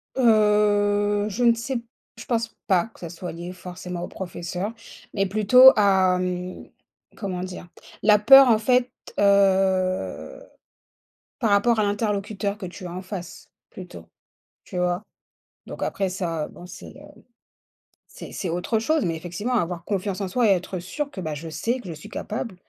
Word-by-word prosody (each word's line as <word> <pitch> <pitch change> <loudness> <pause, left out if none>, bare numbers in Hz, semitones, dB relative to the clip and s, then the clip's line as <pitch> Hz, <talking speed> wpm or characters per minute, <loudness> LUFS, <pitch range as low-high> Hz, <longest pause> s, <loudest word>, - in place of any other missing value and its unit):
Heu, 205 -3 +3
je 220 +5 -2
ne 235 -1 +6
sais 240 +3 -3
p 235 - -8 0.3
je - - -10
pense 230 -2 -2
pas 180 -3 +3
que - - -20
ça 170 - -7
soit 175 +1 -7
lié 175 +2 -7
forcément 180 -1 -7
aux - - -4
professeurs, 180 +2 -5 0.4
mais 195 -2 +1
plutôt 215 +6 +7
à, 190 -3 +3
hem, 180 0 -5 0.5
comment 185 -4 -4
dire? 180 -1 -7 0.4
La 210 0 +6
peur 270 +5 +8
en 220 -2 +4
fait, 250 +2 +2 0.3
heu, 195 - +2 1.0
par 225 - +1
rapport 215 +3 +3
à - - +3
l'interlocuteur 205 0 -2
que 190 - -5
tu 185 +1 -10
as 175 - -6
en 185 - -5
face 185 -2 -8 0.2
plutôt, - - -10 0.6
tu - - -11
vois? 180 +1 0 0.7
Donc - - -5
après 195 -1 -1
ça, 170 -4 -3
heu, - - -13
bon 175 - -12
c'est - - -11
le - - -14 1.1
c'est - - -11
c'est 185 - -4
autre 180 +7 -1
chose, 310 +7 +1
mais 165 -2 -1
effectivement, 180 +9 -4
avoir 175 -6 -1
confiance 195 -1 -2
en 195 - -2
soi 230 +5 +1
et - - +6
être 185 0 -3
sûr 280 - -5
que, 195 - -7
bah, 155 -3 -4
je 160 +3 -7
sais 235 +10 -2
que 245 - -11
je - - -4
suis 150 - -11
capable, 215 -1 -5
195 Hz, 175 wpm, -24 LUFS, 180-215 Hz, 1.1 s, peur